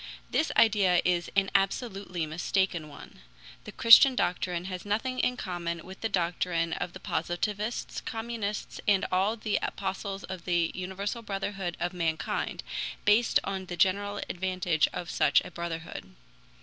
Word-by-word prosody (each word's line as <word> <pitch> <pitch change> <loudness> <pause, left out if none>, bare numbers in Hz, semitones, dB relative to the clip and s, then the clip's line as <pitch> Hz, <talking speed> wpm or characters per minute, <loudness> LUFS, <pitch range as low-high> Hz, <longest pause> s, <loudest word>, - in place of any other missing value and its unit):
This 320 - +1
idea 200 -5 +5
is 175 -1 +1
an 195 -1 +2
absolutely 195 -3 0
mistaken 175 0 -1
one. 145 - -13 0.5
The - - -7
Christian 250 +3 +8
doctrine 180 -3 -1
has 185 -1 -5
nothing 225 +5 -1
in 250 0 +1
common 170 -4 -4
with 190 +1 -11
the 225 - 0
doctrine 170 -2 0
of 180 -1 -3
the - - -9
Positivists, 210 +6 -2
Communists, 225 -3 -4
and 200 -2 +4
all 195 +5 +2
the 215 -1 0
apostles 195 0 -4
of 185 -2 -7
the 175 -2 +1
universal 190 +5 -4
brotherhood 195 -3 -3
of 175 +1 -1
mankind, 165 -3 -2 0.4
based 215 +3 +4
on 190 -1 -4
the 175 - -5
general 205 +2 +2
advantage 180 -3 +1
of 175 -2 -5
such 155 - +4
a - - -8
brotherhood. 165 - -6
190 Hz, 145 wpm, -29 LUFS, 175-205 Hz, 0.5 s, Christian